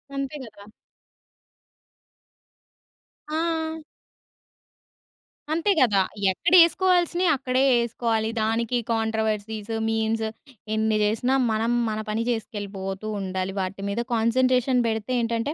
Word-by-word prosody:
అంతే 275 +1 -3
గదా! 205 -2 -14 2.7
ఆ! 320 -1 -1 1.8
అంతే 335 +6 +1
గదా! 210 -7 +4 0.3
ఎక్కడేస్కోవాల్సినియి, 350 - +4
అక్కడే 260 -1 0
యేస్కోవాలి. 230 -2 0
దానికి 230 +2 0 0.2
కాంట్రోవర్సీస్, 220 -1 -2 0.2
మీమ్స్ 225 0 0 0.5
ఎన్ని 220 0 +1
జేసినా, 225 +5 +1 0.2
మనం 220 +2 0 0.2
మన 215 0 -3
పని 220 +2 -1
జేస్కెళ్ళిపోతూ 205 -3 -4
ఉండాలి. 190 0 -3
వాటి 195 +1 -5
మీద 200 +3 -2
కాన్సంట్రేషన్ 250 +2 +2
బెడితే 220 +2 -2
ఏంటంటే 230 +5 -1
225 Hz, 90 wpm, -24 LUFS, 215-260 Hz, 2.7 s, గదా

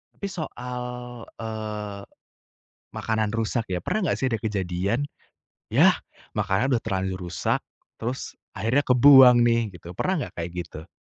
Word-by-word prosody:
Tapi 200 - -4
soal, 125 -8 -5 0.6
eee, 105 -2 -5 0.9
makanan 110 -1 -1
rusak 115 +1 -1
ya, 90 -1 -1
pernah 200 - 0
gak - - 0
sih 130 - +1
ada 115 - 0
kejadian? 100 +2 -1 0.7
Yah, - - +6 0.4
makanan 115 +8 +1
udah 115 - 0
terlanjur 95 -3 -2
rusak, 85 - 0 0.4
terus 125 +3 -4 0.2
akhirnya 115 +8 +1
kebuang 125 -1 +8
nih 115 0 +4 0.2
gitu, 85 0 -11
pernah 185 - -1
gak - - -38
kayak 85 0 -3
gitu? 80 0 -11
110 Hz, 135 wpm, -25 LUFS, 100-125 Hz, 0.9 s, kebuang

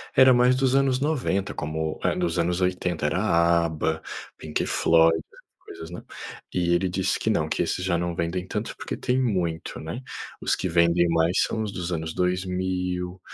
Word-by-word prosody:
era 130 -1 +7
mais 125 +1 +4
dos 130 0 +2
anos 135 -2 +3
90, 130 -10 0
como 80 +1 -3
eh, - - +2
dos 85 -2 -1
anos 90 +2 0
80, 90 -3 -1
era 80 +5 0 0.5
ABA, 80 0 -2 0.4
Pink 75 -1 -2
Floyd, 80 0 +4
essas 80 - -15
coisas, 80 +1 -9
né. 90 - -8 0.5
E 85 -1 +1
ele 95 +1 +1
disse 95 0 0
que - - -1
não, - - +1
que - - 0
esses 90 - -2
já 85 -2 +1
não 85 0 -2
vendem 90 +2 -2
tanto, 105 +3 -4
porque - - -5
tem 130 +1 0
muito, 90 -9 -2
né. 85 +11 -6 0.4
Os - - +1
que 95 - -3
vendem 85 +1 +3
mais 85 +2 +2
são 110 - -2
os 105 - -3
dos 90 -1 -4
anos 80 -1 -3
2000, 90 0 -1
90 Hz, 185 wpm, -25 LUFS, 85-95 Hz, 0.5 s, era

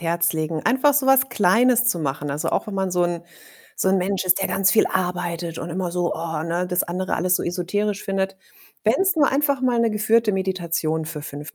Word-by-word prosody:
Herz 170 0 +1
legen, 155 0 -3
einfach 265 +5 +3
so 280 -1 +2
was 265 0 +4
Kleines 240 +3 +3
zu 175 - 0
machen. 145 -1 -3
Also, 145 +2 -2
auch - - -1
wenn 205 - -5
man 190 -1 -1
so 180 0 +1
’n 175 -1 -1 0.5
so - - 0
’n 190 0 +3
Mensch 190 +1 -1
ist, 185 +1 +3
der 195 - +1
ganz 190 -1 +2
viel 215 - +4
arbeitet 175 -2 -3
und 165 - -5
immer 180 +1 -3
so: 175 0 -1
„Oh”, 160 -1 -4
ne, 170 +2 -2
das 180 -1 0
andere 185 +2 -3
alles 180 +2 +1
so - - 0
esoterisch 195 +4 -2
findet. 195 0 -2 0.5
Wenn’s 380 -2 +2
nur 290 -3 +4
einfach 280 -1 +1
mal 245 -2 +2
’ne 230 -1 +2
geführte 215 +1 +2
Meditation 170 -4 -2
für 150 -2 -6
5 145 0 -8
185 Hz, 220 wpm, -22 LUFS, 170-215 Hz, 0.5 s, was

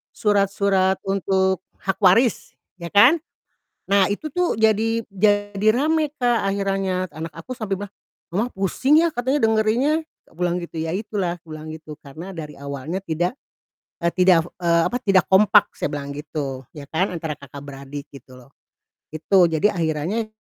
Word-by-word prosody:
Surat-surat 200 -2 +2
untuk 190 -1 +1 0.2
hak 190 - -1
waris, 220 +5 +4 0.2
ya 170 -1 -8
kan? 245 +10 +7 0.8
Nah, 200 -2 +4
itu 260 +9 -4
tuh 360 -5 0
jadi 220 +1 +2
jadi 205 +1 +1
rame, 310 +4 +1
Kak, 245 -2 +2
akhirannya, 195 -2 -1
anak 160 +1 -7
aku 255 - -7
sampai 215 -6 -3
bilang, 200 0 -8 0.4
"Mama, 210 +7 0
pusing 260 - +3
ya," 335 - +1
katanya 260 +2 0
dengerinnya, 225 +8 +2 0.2
tak - - -26
pulang 175 -1 0
gitu, 165 -1 -7
"Ya, 165 +2 -2
itulah," 195 -4 -2
kubilang 155 -1 -9
gitu, 155 -1 -11
"Karena 160 +7 -9
dari 155 -4 -8
awalnya 140 +6 -5
tidak, 175 - -1 0.7
eee, 170 - +2
tidak 180 -2 +4
fo 175 - -11
eee, 170 -1 +3
apa, 245 - 0
tidak 195 -6 +3
kompak," 210 +2 +5
saya - - -3
bilang 140 -1 -4
gitu, 140 -3 -5
ya 145 - -8
kan, 180 +4 0
antara 160 -3 -4
kakak 140 0 -10
beradik, 140 0 -8
gitu 130 -2 -14
loh, 125 +1 -17 0.6
itu. 175 +5 +2
"Jadi 165 +5 +2
akhirannya 170 +5 -1
190 Hz, 160 wpm, -22 LUFS, 160-215 Hz, 0.8 s, kan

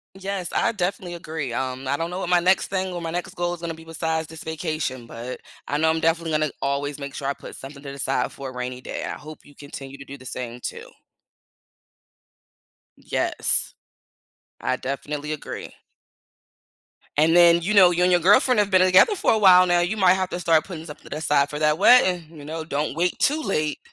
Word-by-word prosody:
Yes, 195 -2 -4
I - - +1
definitely 180 -3 -3
agree, 155 -7 -5
um, 130 +1 -3
I 140 - +1
don't 165 +2 -3
know 180 - -4
what 175 - -3
my 180 -1 +4
next 185 +2 +3
thing 190 -1 -2
or 175 - -4
my 165 -1 -4
next 175 +1 -4
goal 175 0 -1
is 170 - -12
gonna 170 - -3
be 160 0 -12
besides 160 -1 -2
this 160 -1 -9
vacation, 155 -6 -3
but 120 +2 -7 0.3
I 145 - 0
know 160 +1 +3
I'm 160 0 +1
definitely 165 0 +1
gonna 155 -1 +1
always 140 +1 -2
make 140 -1 -7
sure 135 - -4
I - - +1
put - - -11
something 140 +1 -10
to 140 -1 -7
the 140 - -10
side 135 +1 -1
for 135 -1 -7
a - - -11
rainy 125 0 -5
day. - - -5
I - - -4
hope 155 +1 -12
you 145 - -17
continue 140 -1 -9
to 140 - -11
do 140 0 -10
the 130 - -14
same 125 -1 -6
too. - - -7 2.1
Yes, - - -1 0.9
I 130 0 -1
definitely 145 +3 -4
agree. 150 - -6 1.5
And 165 +2 +4
then, 170 -1 +7
you 210 +5 -1
know, 185 -3 +8
you 180 +1 +2
and 180 - +3
your 175 - +4
girlfriend 210 +7 +5
have 205 -1 +2
been 185 -1 +5
together 185 - +6
for 375 - +2
a 220 - +2
while 185 -2 +7
now. 175 0 +3
You 195 +5 -1
might 185 -2 +5
have 185 -1 -2
to 180 - -4
start 165 -3 +3
putting 165 -4 -8
something 150 - -12
aside 145 -2 +1
for 150 - -4
that 150 0 +2
wedding, 185 -5 +5
you 150 -3 -12
know, 160 +1 -5
don't 150 -1 -2
wait 175 +1 0
too 305 +3 +1
late. 155 - -1
160 Hz, 215 wpm, -23 LUFS, 140-180 Hz, 2.1 s, know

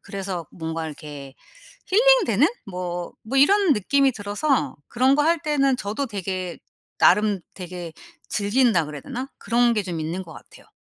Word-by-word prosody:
그래서 190 -4 -5
뭔가 160 -1 -4
이렇게 145 -3 -9 0.5
힐링되는? 405 - +4 0.2
뭐 180 -2 -5
뭐 265 +5 -3
이런 390 +4 +5
느낌이 270 +5 +2
들어서 210 +7 -1
그런 260 +3 +3
거 295 - +3
할 330 +2 +3
때는 275 -4 +1
저도 230 +5 -3
되게 185 -4 -4 0.4
나름 210 -1 +4
되게 175 -2 -7 0.4
즐긴다 210 -4 +2
그래야 150 -1 -7
되나? 255 +3 -5
그런 235 +2 +2
게 210 - 0
좀 175 -4 -4
있는 165 +4 -3
것 165 -3 -12
같아요. - - -15
205 Hz, 300 characters per minute, -23 LUFS, 175-270 Hz, 0.5 s, 이런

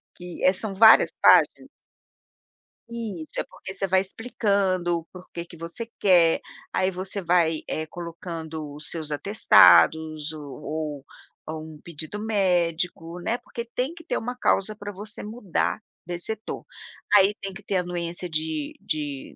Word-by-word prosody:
que 180 -1 -9
eh, 185 - +6
são 200 +1 -2
várias 220 +3 +7
páginas? - - +5 1.2
Isso, 215 -9 -5
é - - +1
porque 190 - -9
você 195 0 -1
vai 190 0 +4
explicando 195 -5 0
o 165 - -14
porquê 175 -1 -9
que 170 - -14
você 170 +8 -6
quer, 175 -4 +5 0.3
aí 185 0 +1
você 190 +2 -4
vai, 170 -2 +2
eh, 155 - -2
colocando 165 -3 -7
os 150 +1 -9
seus 160 -3 -5
atestados 155 - +5
ou 150 -1 -9
ou 150 -2 -4 0.4
ou 155 0 -5
um 150 - -17
pedido 165 +4 -6
médico, 180 -5 0
né. 225 +7 -1
Porque 235 -1 -7
tem 260 +6 -1
que 335 - -13
ter - - -2
uma 245 +2 -4
causa 215 -3 +1
para 205 0 -7
você 210 +2 -7
mudar 210 -3 -2 0.3
desse 175 0 -5
setor. 220 0 -5 0.5
Aí 200 +1 +6
tem 195 -1 -5
que 200 +1 -11
ter 195 - -1
anuência 175 0 -3
de 155 -2 -2
de 145 -3 -4
175 Hz, 150 wpm, -25 LUFS, 160-200 Hz, 1.2 s, várias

